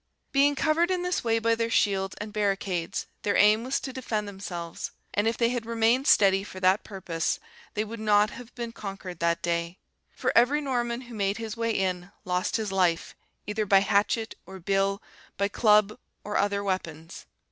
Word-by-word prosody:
Being 285 +1 +4
covered 325 +4 +2
in 365 -1 0
this 360 -4 -1
way 225 -1 +2
by 230 0 +2
their 230 0 0
shields 195 -3 +1
and 210 0 -6
barricades, 195 -4 -1 0.2
their 205 - 0
aim 210 +2 +5
was 260 +2 -1
to 265 - -6
defend 220 -5 -3
themselves: 180 -4 -6 0.2
and 205 +2 +1
if 225 - 0
they 235 -1 +3
had 245 -1 -2
remained 230 +3 +2
steady 195 -1 +5
for 190 -2 -9
that 185 +2 +3
purpose, 175 -5 -2 0.4
they 210 - +1
would 225 +1 -7
not 210 0 +3
have 245 -1 -10
been 235 -2 -4
conquered 195 -5 -7
that 170 0 0
day; 170 +1 -1 0.4
for - - 0
every 250 +6 +5
Norman 245 -4 -1
who 245 -2 -11
made 200 -2 0
his 225 -2 -5
way 230 0 -1
in, 185 -3 -1
lost 180 0 0
his 220 -3 -1
life, 180 -3 +1 0.3
either 210 0 -2
by 195 0 +6
hatchet, 210 +2 +1
or 190 +1 -9
bill, 195 +2 0 0.3
by 200 0 +2
club, 210 0 +3 0.2
or 210 - -5
other 200 0 +1
weapons. 170 -4 -4
210 Hz, 185 wpm, -27 LUFS, 190-230 Hz, 0.4 s, by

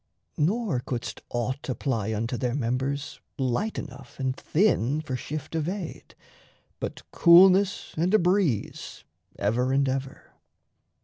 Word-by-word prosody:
Nor 190 - +1
couldst 120 -1 -5
aught 125 +4 -3
apply 115 -5 -1
Unto 115 +3 -2
their 120 +1 -1
members 135 +3 -2 0.2
light 135 - -1
enough 140 0 -9
and 130 -1 -1
thin 150 - +1
For 135 -5 -4
shift 150 +4 -6
of 160 0 -1
aid 185 -3 -6 0.6
but - - -5
coolness 190 +3 +5
and 170 +4 +1
a 215 - +6
breeze 180 - 0 0.3
Ever 120 +5 +1
and 140 0 +2
ever. 135 0 -4
140 Hz, 125 wpm, -26 LUFS, 125-170 Hz, 0.6 s, a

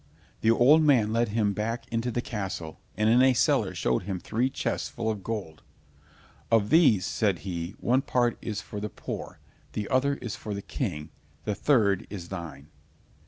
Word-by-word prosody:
The 110 - +2
old 130 +7 +6
man 125 -8 +4
led 115 0 +2
him 105 -1 +1
back 115 +4 -3
into 115 +1 -1
the 120 +1 -2
castle, 95 -7 -5 0.2
and 110 0 +2
in 120 +3 +5
a 130 -1 +5
cellar - - +2
showed 60 -1 +1
him 95 -1 -4
three 115 +8 0
chests - - -2
full 115 -2 -2
of 105 -3 -6
gold. 100 -9 -5 0.9
"Of 110 -2 +3
these," 130 - +5
said 100 -6 0
he, 85 -1 -4
"one 130 +3 +2
part 120 -3 +1
is 105 -2 -4
for 105 +1 -7
the 105 +1 -4
poor, - - -7 0.4
the 105 -1 -3
other 140 +2 +2
is 120 -6 -6
for 105 -2 -5
the 100 - -5
king, 75 0 -4 0.3
the 105 - -1
third 100 -6 +2
is 90 -4 -7
thine." 80 -7 -7
110 Hz, 180 wpm, -27 LUFS, 95-120 Hz, 0.9 s, old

